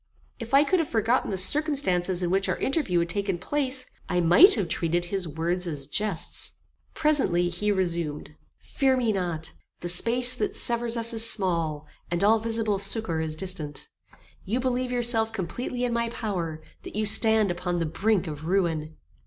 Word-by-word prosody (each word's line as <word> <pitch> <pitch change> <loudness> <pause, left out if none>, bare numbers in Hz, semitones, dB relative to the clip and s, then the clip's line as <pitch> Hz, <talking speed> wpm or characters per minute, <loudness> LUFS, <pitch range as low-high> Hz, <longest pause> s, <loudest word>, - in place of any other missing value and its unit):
If 230 +2 -2
I 280 - +6
could 360 +5 +1
have 325 - -1
forgotten 230 +2 0
the 195 - -3
circumstances 190 - +2
in 175 - -1
which 195 +1 0
our - - -1
interview 270 - -1
had 170 0 0
taken 195 0 -2
place, 260 +5 -2 0.2
I 180 - 0
might 175 - +6
have 200 -6 -2
treated 170 +1 -1
his 185 0 -3
words 170 +4 -3
as 145 -4 -5
jests. 210 +9 -2 0.4
Presently, 270 - +1
he 210 +4 -2
resumed: 170 -6 -3 0.2
"Fear 265 -2 0
me 240 -3 0
not: 175 -4 -4 0.3
the 175 - -4
space 240 +7 +5
that - - -3
severs 235 0 -1
us 230 0 0
is 225 0 +2
small, 165 -7 -1 0.2
and 175 +2 -2
all 220 +2 +4
visible 225 -2 -1
succour 195 -5 +1
is 155 -1 -3
distant. 160 -5 -4 0.5
You 225 +6 -2
believe 255 0 -2
yourself 235 -2 +4
completely 225 +6 -5
in 245 -1 -1
my 235 0 -1
power; 175 -9 -5 0.2
that - - -10
you 215 0 0
stand 220 -1 +4
upon 175 0 -3
the 165 - -1
brink 195 +4 0
of 155 -1 -7
ruin. 165 -4 -1
195 Hz, 175 wpm, -25 LUFS, 170-235 Hz, 0.5 s, I